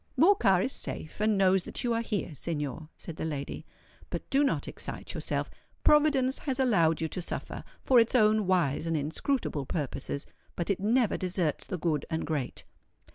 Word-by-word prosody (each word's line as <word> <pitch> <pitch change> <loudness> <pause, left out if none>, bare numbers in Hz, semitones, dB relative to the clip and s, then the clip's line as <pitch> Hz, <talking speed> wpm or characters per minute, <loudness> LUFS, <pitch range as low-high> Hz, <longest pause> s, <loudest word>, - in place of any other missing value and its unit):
"Morcar 250 - +5
is 265 - -2
safe 160 -4 -5
and 215 -1 +3
knows 190 -1 +4
that - - -3
you 240 -1 +1
are 230 - +1
here, 210 -7 -3
Signor," 150 0 -4
said 165 -2 -8
the - - -4
lady. 145 -3 -4 0.4
"But - - -5
do 275 +1 +4
not 280 - 0
excite - - -6
yourself. - - -2 0.4
Providence 285 -3 +4
has 270 -3 -2
allowed 170 -12 +3
you 160 - +1
to 180 - -3
suffer, - - -5 0.2
for 255 -2 +6
its 230 +2 +2
own 215 -3 +4
wise 165 -4 +1
and 165 -1 +1
inscrutable 155 - -1
purposes; 145 -2 -3 0.3
but 175 +3 -1
it 195 - -1
never 225 +3 +2
deserts 180 -4 -1
the 185 - -3
good 155 -3 -1
and 160 -1 -2
great." 145 -6 -3
185 Hz, 180 wpm, -29 LUFS, 160-240 Hz, 0.4 s, for